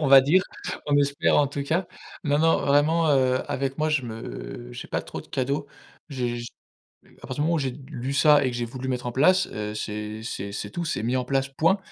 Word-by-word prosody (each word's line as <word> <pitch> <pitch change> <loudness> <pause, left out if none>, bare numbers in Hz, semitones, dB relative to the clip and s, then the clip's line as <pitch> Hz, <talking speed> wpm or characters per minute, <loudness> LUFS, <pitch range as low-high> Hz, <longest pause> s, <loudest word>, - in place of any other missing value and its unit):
on 150 - +1
va 135 0 +9
dire, 175 +8 +4 0.4
on 145 -1 +3
espère, 140 0 +3
en 145 - +4
tout 140 +1 -4
cas. 165 +6 0 0.4
Non, 145 0 +2
non, 165 +1 +4
vraiment, 155 +4 +3
heu, 130 -2 +3
avec 135 0 -1
moi, 155 0 0
je 150 -4 +2
me - - -7
j'ai - - -8
pas - - -1
trop - - -7
de - - -15
cadeaux. 140 +3 -2 0.4
J'ai 125 -4 -2
j 120 - -6 0.7
à - - -8
partir 130 - -5
du - - -3
moment 170 +2 +2
où - - +2
j'ai 135 -3 -1 0.2
lu 130 +3 -4
ça 145 0 +5
et 130 - +1
que 120 - -5
j'ai 120 -1 -2
voulu 130 +2 -6
mettre 125 -1 -2
en 120 - -2
place, 185 +8 +4
heu, 105 0 -4
c'est 105 0 -5
c'est 100 -4 -5
c'est 105 - -4
tout 175 - -3
c'est 145 - -2
mis 125 +3 0
en 125 - 0
place 135 +1 0
point. 165 +8 +2
135 Hz, 240 wpm, -25 LUFS, 120-150 Hz, 0.7 s, va